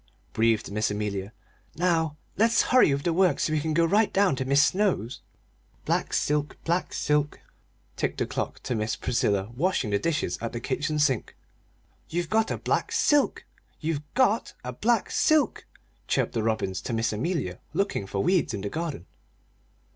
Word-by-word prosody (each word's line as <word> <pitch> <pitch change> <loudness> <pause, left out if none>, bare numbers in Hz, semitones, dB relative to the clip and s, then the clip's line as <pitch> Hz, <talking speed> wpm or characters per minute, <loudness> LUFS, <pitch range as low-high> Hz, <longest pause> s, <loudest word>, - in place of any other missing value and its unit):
breathed 115 -2 +1
Miss 105 +2 0
Amelia. 105 -1 -3 0.4
"Now 165 -3 +1 0.2
let's 225 +3 +4
hurry 255 - +6
with 140 +1 -1
the 170 - +1
work 180 -4 +3
so 155 - 0
we 155 - +2
can 155 +1 -2
go 170 0 +4
right 210 +5 +3
down 195 -6 +3
to 130 - -2
Mis' 140 +2 +5
Snow's." 180 - 0 0.6
"Black - - 0
silk 150 0 0
black 175 +2 0
silk!" 150 0 0 0.6
ticked - - -2
the - - 0
clock - - -4
to - - -2
Miss 110 -1 -1
Priscilla 100 -3 0
washing 150 - 0
dishes 100 - 0
at 115 - -4
the 120 - -3
kitchen 145 +5 -2
sink. 135 -6 +1 0.7
"You've 175 0 -2
got 220 0 +2
a - - -2
black - - -1
silk! 295 -1 +2 0.3
You've 155 -2 -2
got 240 -4 +2
a 125 0 -5
black 225 - +1
silk!" 305 -6 +2 0.4
chirped - - 0
the 115 - 0
robins 110 -4 -1
to 120 - -4
Miss 115 0 0
Amelia 115 - -2 0.2
looking 195 - -1
for 100 0 -2
weeds 180 - +2
in 100 - -5
the 100 - -3
garden. 155 - -4
150 Hz, 170 wpm, -26 LUFS, 110-180 Hz, 0.7 s, hurry